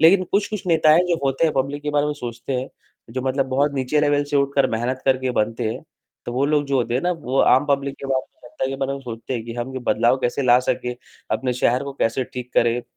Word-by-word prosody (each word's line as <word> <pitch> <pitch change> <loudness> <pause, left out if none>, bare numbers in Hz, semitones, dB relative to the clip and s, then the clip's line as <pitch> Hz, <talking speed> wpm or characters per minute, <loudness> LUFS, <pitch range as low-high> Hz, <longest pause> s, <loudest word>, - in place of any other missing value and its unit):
लेकिन 185 +4 +6
कुछ-कुछ 200 -1 -1
नेता 160 -2 +4
हैं 175 +3 +5
जो 170 -2 +1
होते 135 +4 +1
हैं, 155 - +2
पब्लिक 140 +2 -1
के 150 - -2
बारे 145 0 +2
में 150 - -1
सोचते 120 0 -6
हैं, 130 - -6 0.4
जो 130 +2 -3
मतलब 135 +1 0
बहुत 140 +3 +1
नीचे 135 +3 +1
लेवल 145 -1 +2
से 145 0 -1
उठकर 140 0 +2
मेहनत 120 +3 -2
करके 130 -1 +2
बनते 110 0 -1
हैं, - - -8 0.4
तो 120 - -3
वो 130 +3 +1
लोग 150 -1 +2
जो 140 -1 +1
होते 120 -1 0
हैं 130 - +1
ना, 180 - +1
वो 135 -5 -3
आम 130 +3 +4
पब्लिक 140 -1 0
के 140 - -5
बारे 130 -1 +1
में, 120 - -16
जनता 130 - -3
के 135 - -3
बारे 135 0 -2
में 140 - -5
सोचते 120 0 -6
हैं 115 -2 -4
कि 115 0 -7
हम 120 +2 -4
ये - - -2
बदलाव 120 +3 +3
कैसे 125 +3 0
ला 125 -1 +6
सकें, 125 -1 -2 0.4
अपने 130 -1 0
शहर 125 +1 +1
को 140 - -5
कैसे 125 0 0
ठीक 125 0 -6
करें? 120 +1 +2
135 Hz, 260 wpm, -22 LUFS, 125-145 Hz, 0.4 s, लेकिन